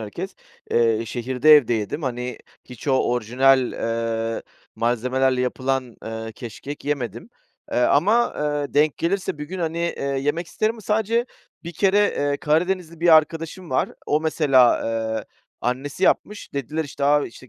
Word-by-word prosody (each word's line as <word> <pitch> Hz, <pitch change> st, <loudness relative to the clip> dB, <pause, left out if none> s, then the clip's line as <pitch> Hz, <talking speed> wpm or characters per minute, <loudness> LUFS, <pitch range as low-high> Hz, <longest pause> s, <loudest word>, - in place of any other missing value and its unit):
herkes, 175 Hz, -, -6 dB, 0.4 s
eee, 115 Hz, -1 st, +2 dB
şehirde 130 Hz, +6 st, +4 dB
evde 120 Hz, -4 st, +2 dB
yedim. 110 Hz, -, -3 dB
Hani, 125 Hz, -2 st, -3 dB, 0.3 s
hiç 125 Hz, +3 st, -9 dB
o 135 Hz, -, +3 dB, 0.2 s
orijinal, 125 Hz, +2 st, +3 dB
eee, 115 Hz, 0 st, -2 dB, 0.3 s
malzemelerle 125 Hz, +3 st, +1 dB
yapılan, 130 Hz, -1 st, -2 dB
ııı, 110 Hz, 0 st, -5 dB
keşkek 130 Hz, +6 st, -8 dB
yemedim. 125 Hz, -, -3 dB, 0.4 s
Eee, -, -, +1 dB
ama, 200 Hz, -, +3 dB
eee, 145 Hz, -1 st, -2 dB
denk 150 Hz, 0 st, +3 dB
gelirse 175 Hz, -2 st, -1 dB
bir 150 Hz, -, -4 dB
gün, 185 Hz, +5 st, -7 dB
hani, 165 Hz, -1 st, -2 dB
eee, 170 Hz, 0 st, -2 dB
yemek 145 Hz, +5 st, -1 dB
isterim 215 Hz, +5 st, -1 dB
ama 225 Hz, -, -12 dB
sadece 220 Hz, +3 st, 0 dB, 0.4 s
bir 170 Hz, -, -6 dB
kere, 195 Hz, +4 st, +2 dB
eee, 145 Hz, -8 st, +1 dB
Karadenizli 170 Hz, +2 st, 0 dB
bir 175 Hz, -, +2 dB
arkadaşım 165 Hz, +2 st, -1 dB
var, 130 Hz, -, +1 dB, 0.2 s
o 150 Hz, +1 st, +2 dB
mesela, 140 Hz, -6 st, +4 dB, 0.4 s
eee, -, -, -7 dB, 0.4 s
annesi 140 Hz, +8 st, -2 dB
yapmış. 210 Hz, 0 st, 0 dB
Dediler, 150 Hz, +4 st, -3 dB
işte, 140 Hz, 0 st, -4 dB
a, 145 Hz, 0 st, +3 dB
işte, 125 Hz, +2 st, -14 dB
140 Hz, 150 wpm, -23 LUFS, 125-165 Hz, 0.4 s, şehirde